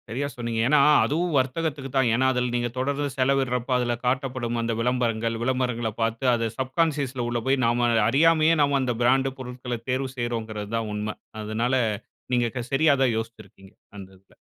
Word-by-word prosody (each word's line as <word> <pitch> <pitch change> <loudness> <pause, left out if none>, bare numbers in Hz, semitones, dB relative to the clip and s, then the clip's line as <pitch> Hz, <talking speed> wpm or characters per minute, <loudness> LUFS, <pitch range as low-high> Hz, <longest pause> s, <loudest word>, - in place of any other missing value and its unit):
சரியா 135 +6 -2
சொன்னீங்க. 115 -2 -3
ஏன்னா 150 +2 +4 0.3
அதுவும் 170 +3 -1
வர்த்தகத்துக்கு 135 +1 -1
தான். 130 -2 +3
ஏன்னா 130 +3 +2
அதுல 125 -1 -1
நீங்க 120 0 0
தொடர்ந்து 140 +2 -1
செலவிடுறப்ப 130 -2 +1
அதுல 120 -1 0
காட்டப்படும் 125 -2 -1
அந்த 115 0 -1
விளம்பரங்கள், 115 -2 0
விளம்பரங்கள 125 -3 -1
பார்த்து 115 +3 -1
அத 115 -1 0
சப்கான்ஷியஸ்ல 135 -2 -1
உள்ள 120 -1 -1
போய் 135 0 +2
நாம 120 +1 +2 0.2
அறியாமயே 160 +4 +4
நாம 140 -1 +3
அந்த 125 -2 -1
பிராண்டு 135 +2 +3
பொருட்கள 125 -1 -5
தேர்வு 130 +1 -1
செய்றோம்ங்கிறது 110 -3 -4
தான் 115 -1 -3
உண்மை. 105 +1 -3 0.3
அதனால 115 +4 -1 0.6
நீங்க 120 -1 +2
க - - -1
சரியா 155 +2 +4
தான் 130 -2 +3
யோசித்துருக்கீங்க, 110 -4 -8 0.2
அந்த 95 -2 -9
இதுல. 95 +1 -27
125 Hz, 160 wpm, -25 LUFS, 115-135 Hz, 0.6 s, ஏன்னா